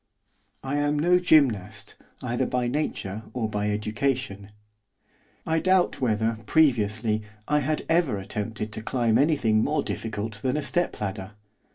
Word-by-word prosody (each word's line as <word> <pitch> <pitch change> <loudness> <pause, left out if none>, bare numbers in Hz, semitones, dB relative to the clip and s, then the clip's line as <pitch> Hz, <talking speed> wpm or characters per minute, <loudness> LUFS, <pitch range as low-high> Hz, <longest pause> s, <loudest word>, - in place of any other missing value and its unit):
I 135 +2 -2
am 145 0 +1
no 175 +4 +4
gymnast, 110 - +2 0.3
either 120 -1 -1
by 125 -1 0
nature 110 -7 -2
or 120 -3 -1
by 105 -1 -1
education; 110 0 -2 1.0
I 160 0 +1
doubt 185 -2 +2
whether, 110 -2 0
previously, 110 -6 +2 0.3
I 150 0 +3
had 150 +2 -1
ever 165 - +2
attempted 105 +2 -4
to 110 - -5
climb 115 0 +1
anything 120 -8 +3
more 150 +1 0
difficult 105 -1 -4
than 130 +4 0
a 150 - -2
step 175 +5 0
ladder. 95 0 -4
115 Hz, 140 wpm, -26 LUFS, 105-145 Hz, 1.0 s, no